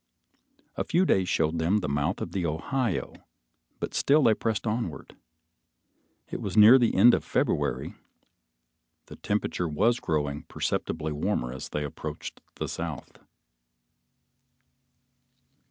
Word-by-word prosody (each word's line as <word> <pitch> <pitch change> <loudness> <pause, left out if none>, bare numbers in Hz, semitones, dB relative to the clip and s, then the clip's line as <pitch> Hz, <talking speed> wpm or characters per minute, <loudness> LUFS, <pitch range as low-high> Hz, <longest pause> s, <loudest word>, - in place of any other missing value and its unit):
A - - 0
few 180 +3 +2
days 95 - +2
showed 80 +1 +1
them 85 +6 +2
the 75 - -3
mouth 75 +6 -1
of - - -4
the 95 - -2
Ohio, 85 - -2 0.7
but - - -4
still 150 +2 +3
they 115 - +5
pressed 110 0 -2
onward. 105 -7 -4 1.2
It - - -4
was 100 +1 -4
near 110 +5 +9
the 120 -2 +2
end 120 +6 +7
of - - +1
February, - - -1 1.1
the - - -11
temperature 105 -4 -2
was 115 +11 +2
growing 75 -2 -2
perceptibly 80 0 -2
warmer 75 -5 -2
as 65 - -7
they 75 - -3
approached 75 - -7
the - - -4
South. 80 -4 -6
90 Hz, 125 wpm, -27 LUFS, 75-110 Hz, 1.2 s, near